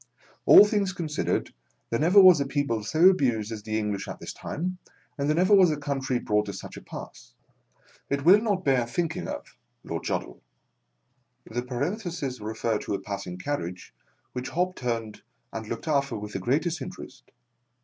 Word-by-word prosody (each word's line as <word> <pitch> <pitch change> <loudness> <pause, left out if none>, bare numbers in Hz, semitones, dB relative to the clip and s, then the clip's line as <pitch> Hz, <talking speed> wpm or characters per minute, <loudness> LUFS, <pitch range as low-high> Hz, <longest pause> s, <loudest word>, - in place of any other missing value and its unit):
All 205 - +10
things 205 -3 0
considered, 160 -4 -2 0.4
there 115 - +1
never 175 +6 +6
was 185 -6 +8
a 140 - -1
people 135 -6 -1
so 160 - +4
abused 120 - +1
as 110 -2 -5
the 110 +1 -2
English 105 -2 -2
at - - -7
this - - -7
time, 180 +4 -4 0.4
and 140 -1 -1
there 155 - +3
never 185 +4 +3
was 190 -3 +7
a 150 - -1
country 135 -3 -2
brought 105 -2 0
to 100 - -4
such 95 - -8
a - - -9
pass. - - -10 0.7
It 140 +1 -1
will 195 +5 +7
not 200 -5 -1
bear 130 -4 +2
thinking 170 +7 -2
of - - -7
— - - -47
(Lord - - -5
Joddle)." - - -3 1.1
The 120 +2 -3
paren 140 - -3
thesis 145 - -4
referred 110 +1 -2
to 100 - -2
a - - -3
passing 100 -3 -6
carriage, 90 -6 -5 0.4
which 125 +1 -4
Hobbs 180 +5 -1
turned 115 -3 -3 0.3
and 110 -1 -5
looked 115 +7 -5
after 140 -5 +1
with 105 0 -7
the - - -2
greatest 155 - 0
interest. 180 -7 -9
140 Hz, 180 wpm, -26 LUFS, 110-175 Hz, 1.1 s, All